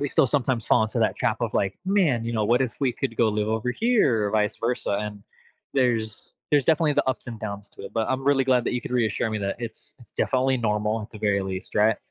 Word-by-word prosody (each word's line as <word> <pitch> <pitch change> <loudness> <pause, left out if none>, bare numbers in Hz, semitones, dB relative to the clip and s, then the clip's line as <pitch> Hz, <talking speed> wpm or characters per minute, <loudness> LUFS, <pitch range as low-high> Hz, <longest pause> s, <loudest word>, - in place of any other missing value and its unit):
we 145 - 0
still 135 - +3
sometimes 125 -2 0
fall 115 - +4
into 110 0 -2
that - - +2
trap - - 0
of, - - -2
like, 95 -1 0
"Man, 175 - +2
you 115 - -3
know, 110 -2 0
what 120 +4 +3
if 130 -3 0
we 135 -2 +2
could 120 -2 -4
go 115 - +3
live 105 0 0
over 110 +3 -1
here," 135 - +2
or - - -2
vice 105 -1 +1
versa, 120 -2 -2
and 105 -1 -6 0.5
there's 115 -5 -1 0.2
there's 145 -2 +4
definitely 155 0 +3
the - - +1
ups 130 - -2
and 115 -2 -7
downs 100 -2 -6
to - - -13
it, - - -8
but 110 -1 0
I'm 130 +1 -1
really 135 -1 +3
glad 130 -2 +3
that - - -1
you 125 - -1
could - - -8
reassure 115 -2 +1
me 110 - -2
that 100 -1 -2
it's 115 -2 -8
it's 120 - -17
definitely 130 0 +1
normal 105 -1 0
at 105 - -10
the 110 - -9
very 100 -2 +1
least, 95 0 -6
right? 105 +1 +4
115 Hz, 260 wpm, -25 LUFS, 105-130 Hz, 0.5 s, fall